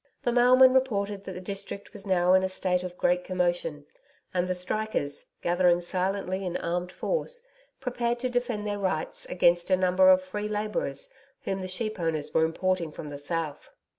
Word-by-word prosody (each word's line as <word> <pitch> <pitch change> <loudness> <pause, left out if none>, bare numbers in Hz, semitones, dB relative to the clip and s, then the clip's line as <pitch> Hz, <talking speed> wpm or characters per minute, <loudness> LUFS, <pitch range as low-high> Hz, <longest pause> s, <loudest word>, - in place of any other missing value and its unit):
The 240 - +1
mailman 255 +2 +6
reported 205 -6 0
that 190 - -5
the 180 - -6
district 200 +1 -6
was 205 -1 -8
now 180 -1 +4
in 185 - +6
a 190 - 0
state 185 -1 0
of 180 -1 -7
great 180 0 +2
commotion, 175 -5 -1 0.5
and 180 -1 +1
the 185 - -1
strikers, 180 -5 -3 0.2
gathering 175 0 +3
silently 185 +1 -2
in 180 -1 -2
armed 175 +1 -2
force, - - -3 0.4
prepared 240 -2 -1
to 255 - +1
defend 245 -4 -1
their 205 -1 -2
rights 185 -5 -2
against 175 0 +3
a 185 - +4
number 185 0 +4
of 185 0 +6
free 205 +3 -4
labourers 210 -9 -3 0.3
whom 195 0 -2
the 185 - -4
sheep 215 +3 -3
owners 160 -3 -2
were 160 - +4
importing 175 0 -1
from 150 - -8
the 145 -1 -7
South. 155 0 -4
185 Hz, 180 wpm, -27 LUFS, 175-210 Hz, 0.5 s, mailman